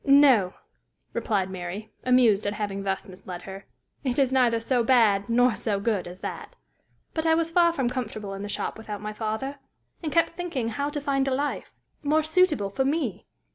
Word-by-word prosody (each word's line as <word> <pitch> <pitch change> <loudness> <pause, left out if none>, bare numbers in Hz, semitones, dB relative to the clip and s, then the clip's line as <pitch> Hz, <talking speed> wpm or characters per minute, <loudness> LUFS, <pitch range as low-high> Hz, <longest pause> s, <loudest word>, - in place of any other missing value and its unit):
"No," 275 -10 +5 0.6
replied 195 -4 0
Mary, 190 +4 -6
amused 240 -5 +4
at 205 - 0
having 205 -2 -3
thus 195 -1 -2
misled 185 -1 -9
her. 195 0 -9 0.4
"It 255 -3 -1
is 270 -2 +3
neither 245 -3 +3
so 240 +1 +1
bad 225 -4 +4
nor 245 +1 +4
so 205 0 -2
good 200 -4 -1
as 180 +1 -10
that. - - -6 0.6
But 320 0 0
I 320 - +5
was 330 0 0
far 340 0 +5
from 270 -7 -1
comfortable 215 -5 -4
in 195 - -6
the 205 - -5
shop 205 - -3
without 210 -2 -6
my 210 0 -5
father, 220 +6 -3 0.4
and 315 -3 -3
kept 335 +3 +3
thinking 330 -9 -3
how 280 +6 -2
to 295 0 -3
find 275 -1 0
a 265 - +1
life, 290 +2 -3 0.3
more 310 +2 +2
suitable 310 - +2
for 265 - 0
me. 275 - -1
235 Hz, 190 wpm, -26 LUFS, 205-280 Hz, 0.6 s, No